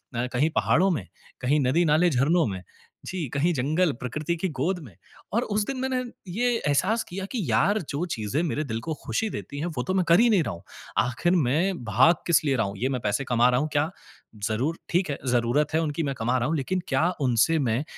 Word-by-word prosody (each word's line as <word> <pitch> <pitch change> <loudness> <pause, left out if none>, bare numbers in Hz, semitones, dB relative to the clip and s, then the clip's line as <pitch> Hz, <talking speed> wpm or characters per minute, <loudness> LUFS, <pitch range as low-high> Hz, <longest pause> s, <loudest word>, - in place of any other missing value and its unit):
अ, 120 - 0
कहीं 140 +6 +2
पहाड़ों 190 +4 +3
में, 105 - -3 0.3
कहीं 140 +4 +2
नदी 140 +7 +2
नाले 160 +3 +4
झरनों 155 +5 +2
में, 95 -3 -4 0.4
जी 180 -5 -3
कहीं 165 +5 +2
जंगल, 155 +6 +1
प्रकृति 150 +7 -2
की 190 - -1
गोद 180 +5 0
में 105 - -13 0.4
और 230 - +2
उस 205 0 -1
दिन 270 - -3
मैंने, 260 -1 -1 0.2
ये 230 +8 0 0.2
एहसास 190 +11 +2
किया 190 +2 -5
कि 250 - -2
यार 200 - +3
जो 145 +5 -2
चीज़ें 110 +7 -1
मेरे 155 -1 -1
दिल 115 -2 -3
को 160 - 0
खुशी 220 -1 -1
देती 140 -6 -6
है 160 - -2
वो 125 - 0
तो 185 - -2
मैं 185 -1 +2
कर 170 - +7
ही 235 +1 +5
नहीं 200 -5 +4
रहा - - -3
हूँ। 85 - -11 0.4
आखिर 130 +8 0
मैं 165 +2 +1
भाग 125 - +5
किस 170 -3 +4
लिए 140 - +2
रहा 110 -4 +1
हूँ, 100 - -7
ये 125 +6 -1
मैं 130 -3 -2
पैसे 105 +6 0
कमा 120 0 +3
रहा 125 0 +2
हूँ 155 - -2
क्या, 145 +2 +2 0.6
ज़रूर 130 +10 -1
ठीक 180 -2 +1
है 140 - -3
ज़रूरत 125 +5 +1
है 160 - +3
उनकी 155 +1 -2
मैं 140 -2 -2
कमा 120 +3 +1
रहा 120 - 0
हूँ, 165 - 0
लेकिन 180 +7 -1
क्या 150 +6 +2
उनसे 130 +6 +3
मैं 120 0 0
150 Hz, 230 wpm, -26 LUFS, 125-175 Hz, 0.6 s, कर